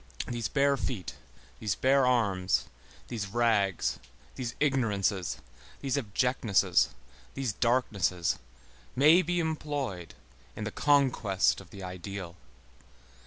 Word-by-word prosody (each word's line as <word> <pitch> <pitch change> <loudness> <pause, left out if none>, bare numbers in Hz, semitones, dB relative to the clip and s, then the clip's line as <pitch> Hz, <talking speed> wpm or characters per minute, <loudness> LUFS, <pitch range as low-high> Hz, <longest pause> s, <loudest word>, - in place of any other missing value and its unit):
These 120 -3 -2
bare 140 +1 +2
feet, 110 -9 -4 0.5
these 105 -5 -1
bare 135 0 +3
arms, 100 -7 +2 0.4
these 110 -5 -3
rags, 105 -4 +1 0.3
these 120 -2 -5
ignorances, 105 - +1 0.4
these 135 -1 -1
abjectnesses, 110 -6 +2 0.5
these 130 -5 -2
darknesses, 100 -8 +1 0.6
may 155 +7 +6
be 175 +1 -1
employed 145 - -3 0.4
in 110 - -5
the 110 - -3
conquest 130 -11 +2
of 90 - -16
the 100 -1 -10
ideal. 90 -1 -6
115 Hz, 105 wpm, -29 LUFS, 95-135 Hz, 0.6 s, may